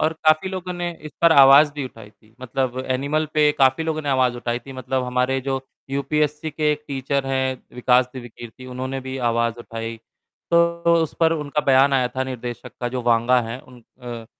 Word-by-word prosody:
और 155 - +2
काफ़ी 155 +4 +4
लोगों 185 -1 -5
ने 175 -1 -3
इस 155 - -7
पर 170 -1 +7
आवाज़ 140 +1 +7
भी 145 -2 -4
उठाई 115 -4 -11
थी, 110 +1 -28
मतलब 130 0 -2
एनिमल 140 +4 0
पे 150 -1 +4
काफ़ी 135 +3 +3
लोगों 155 -1 -2
ने 145 - -4
आवाज़ 130 -2 +2
उठाई 120 0 -2
थी, 135 +3 -12
मतलब 130 0 -2
हमारे 125 +1 0
जो 135 0 -2 0.3
यूपीएससी 150 +3 -1
के 150 0 0
एक 150 0 -7
टीचर 140 0 -2
हैं 130 -1 -1
विकास 125 0 +3
दिव्यकीर्ति 120 0 -10
उन्होंने 130 +1 -4
भी 130 0 -6
आवाज़ 115 0 0
उठाई, 115 0 -6 0.5
तो 170 0 +3 0.2
उस 160 - -4
पर 165 0 +4
उनका 150 -2 -2
बयान 135 +1 +5
आया 130 -2 +2
था 130 - 0
निर्देशक 125 -2 -7
का 120 - -1
जो 125 0 -4
वांगा 120 +1 +3
है 115 +2 -6
उन 125 -2 -17 0.2
अ, 120 -2 -7
130 Hz, 195 wpm, -22 LUFS, 125-150 Hz, 0.5 s, पर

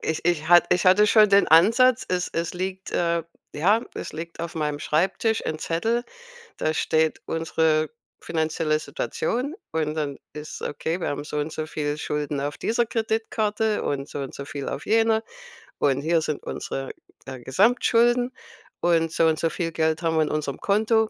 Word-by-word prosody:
Ich 160 - -3
ich 165 -2 +1
hat 175 0 +7
ich 180 - +1
hatte 205 +3 +6
schon 215 0 +6
den 200 0 +5
Ansatz, 225 - +5
es 180 0 -1
es 165 +1 -3
liegt, 190 +1 -4
äh 170 -1 0 0.3
ja, 205 +9 +3
es - - -6
liegt 165 +1 -7
auf 170 0 -5
meinem 150 -2 -2
Schreibtisch 190 +9 0
'n 155 - -3
Zettel, 225 +10 -1 0.5
da 155 - 0
steht 160 0 +1
unsere 160 -1 +1 0.3
finanzielle 160 -1 0
Situation 260 - -3 0.2
und 155 -1 -1
dann 145 -3 -3 0.2
ist 150 +1 -8
okay, 160 +4 -3
wir - - -1
haben 145 0 -3
so 150 - -5
und 150 +2 -2
so 155 - -4
viele 145 -1 -3
Schulden 150 -1 -2
auf 145 +1 -3
dieser 235 +1 +1
Kreditkarte 220 -1 -1
und 140 -1 -2
so - - -6
und 135 -1 -5
so 140 - -7
viel 140 -1 -5
auf 140 - -5
jene 225 0 +3 0.6
und 140 -1 +2
hier 165 +2 +2
sind 155 -2 -3
unsere, 135 0 -5 0.3
äh, 130 -1 -7
Gesamtschulden 240 - +3 0.5
und 165 -2 +2
so 165 - +2
und 160 -1 +1
so 165 - +1
viel 165 0 -3
Geld 160 0 0
haben 165 -1 0
wir 155 - +4
in - - -2
unserem 150 -3 -3
Konto. 220 +2 +2
165 Hz, 180 wpm, -24 LUFS, 155-210 Hz, 0.6 s, hat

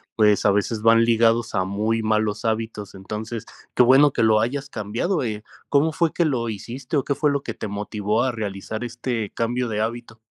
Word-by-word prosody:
pues, 105 -2 +3
a 100 - +6
veces 105 +2 0
van 115 0 +5
ligados 115 0 +2
a 95 - +2
muy 105 +4 -1
malos 110 -1 0
hábitos, 110 -3 -3
entonces 105 +4 -6 0.3
qué - - +6
bueno 135 +4 +6
que 115 - 0
lo 110 -1 +4
hayas 135 +4 -2
cambiado, 120 - -2
eh, 110 -2 -4 0.3
¿cómo 150 +2 +2
fue 165 -1 +1
que 170 - +1
lo 120 -6 -1
hiciste 125 +7 -4
o 135 - +1
qué 140 - 0
fue 150 -1 +1
lo 140 -1 -1
que 115 - -4
te 110 - -6
motivó 105 +2 -1
a 130 - +1
realizar 110 +1 -5
este 120 -2 -3
cambio 120 +1 -2
de 105 -1 -2
hábito? 115 0 -4
115 Hz, 205 wpm, -23 LUFS, 105-125 Hz, 0.3 s, a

